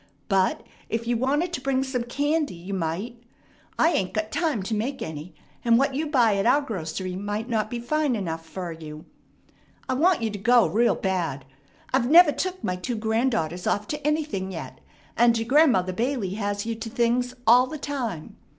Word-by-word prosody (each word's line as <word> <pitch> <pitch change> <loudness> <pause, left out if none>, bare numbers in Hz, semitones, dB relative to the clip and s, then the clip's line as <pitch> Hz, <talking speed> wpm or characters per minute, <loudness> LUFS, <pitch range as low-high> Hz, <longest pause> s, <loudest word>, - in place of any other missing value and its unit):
But 190 -2 +1 0.2
if 230 +1 -2
you 240 +1 0
wanted 290 +9 0
to 295 - -3
bring 265 0 +1
some 260 -2 -2
candy, 290 - -1
you 180 +4 -7
might. 195 +7 -3 0.6
I 325 - +4
ain't 190 - -1
got 215 0 -2
time 300 - 0
to 210 - -3
make 250 +6 -2
any, 160 +2 -7 0.3
and 230 -1 +5
what 275 +2 +2
you 305 +4 -1
buy 240 -8 +3
at 195 - +1
our 265 +4 +5
grocery 185 - -4
might 205 +3 -3
not 220 -3 -1
be 240 - -4
fine 295 +2 0
enough 165 -6 -4
fer 175 +2 -6
you. 155 -1 -9 0.8
I 260 - 0
want 320 0 +3
you 220 - 0
to 205 - -6
go 240 +2 +5
real 235 +3 +2
bad. 170 -8 -2 0.5
I've 255 -2 +2
never 335 0 +8
took 370 +4 -3
my 180 - -1
two 235 +7 -3
granddaughters 220 -7 -1
off 205 +1 0
to 295 0 -3
anything 300 -12 -1
yet, 155 -8 -8 0.3
and 235 -1 +4
your 225 0 -3
Grandmother 245 - +4
Bailey 235 -2 -1
has 205 0 -2
you 230 - -2
to 225 0 -6
things 245 +1 0
all 245 +3 +6
the 310 - -6
time. 250 - -5
230 Hz, 190 wpm, -25 LUFS, 190-265 Hz, 0.8 s, never